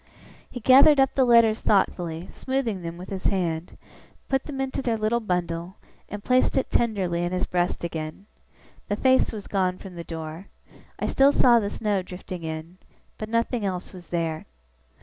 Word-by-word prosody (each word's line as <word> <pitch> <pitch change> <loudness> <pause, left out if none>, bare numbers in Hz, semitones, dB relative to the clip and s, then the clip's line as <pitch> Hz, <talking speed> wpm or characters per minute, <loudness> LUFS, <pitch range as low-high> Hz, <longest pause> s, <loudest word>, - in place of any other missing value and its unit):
He 250 - -7
gathered 270 +5 +7
up 270 -1 +3
the 265 - +3
letters 230 -2 +5
thoughtfully, 175 -4 0
smoothing 260 -8 -3
them 170 0 -6
with 180 +1 -9
his 190 -1 -6
hand; 175 -4 -1 0.5
put 270 -1 0
them 280 -3 -6
into 270 0 -2
their 235 -3 0
little 215 +2 +1
bundle; 180 -3 -3 0.3
and 205 -1 -7
placed 255 +1 +2
it 265 - 0
tenderly 190 -7 0
in 175 - -2
his 185 - -1
breast 175 -1 -1
again. 160 +2 -5 0.6
The 205 - 0
face 260 +4 +3
was 210 -3 -7
gone 185 -2 0
from 190 -1 -10
the 170 -1 -7
door. 160 +2 -7 0.5
I - - -2
still 275 +1 +4
saw 245 -4 +5
the 200 -2 -2
snow 205 -2 -1
drifting 180 -1 -8
in; 160 +3 -7 0.4
but 215 - -5
nothing 230 0 0
else 185 -1 -4
was 180 -2 -12
there. 165 -2 -3
195 Hz, 175 wpm, -25 LUFS, 175-235 Hz, 0.6 s, gathered